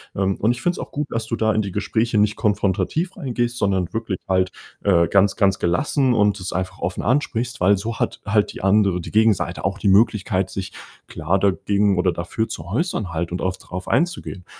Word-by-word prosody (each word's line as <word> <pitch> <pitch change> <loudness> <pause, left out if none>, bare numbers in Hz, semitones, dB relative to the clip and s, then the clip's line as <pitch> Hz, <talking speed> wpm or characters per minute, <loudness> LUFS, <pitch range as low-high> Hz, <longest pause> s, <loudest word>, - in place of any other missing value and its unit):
Ähm, 95 0 0
und 110 - +2
ich 120 0 -4
finde 175 0 +1
es - - -8
auch - - -7
gut, 145 0 -3
dass 115 -1 -2
du 115 - -1
da 110 -1 +1
in 110 - +1
die 100 -3 -5
Gespräche 115 -1 0
nicht 105 0 +2
konfrontativ 105 - 0
reingehst, 120 -5 -2
sondern 95 -5 0
wirklich 110 -4 -3
halt, 95 0 +1 0.3
äh, 85 -4 +3
ganz 100 0 +3
ganz 95 -2 +2
gelassen 130 - +1
und 105 -3 +2
es 90 -1 -5
einfach 95 +1 -3
offen 90 - -3
ansprichst, 125 -2 0
weil 100 +2 +4
so 110 +3 -5
hat - - -2
halt 105 0 +1
die - - -8
andere 95 -2 +3
die - - -8
Gegenseite 110 -3 +2
auch 100 +1 -1
die 100 - +1
Möglichkeit, 95 -2 +2
sich 95 -1 -5 0.4
klar 95 +3 -1
dagegen 100 +1 +1
oder 90 0 +2
dafür 95 +6 -3
zu 95 -8 -6
äußern 110 - -2
halt 85 +1 -3
und 90 - -3
auch 95 0 -1
drauf 90 0 -8
einzugehen 165 - -1
100 Hz, 210 wpm, -21 LUFS, 95-115 Hz, 0.4 s, weil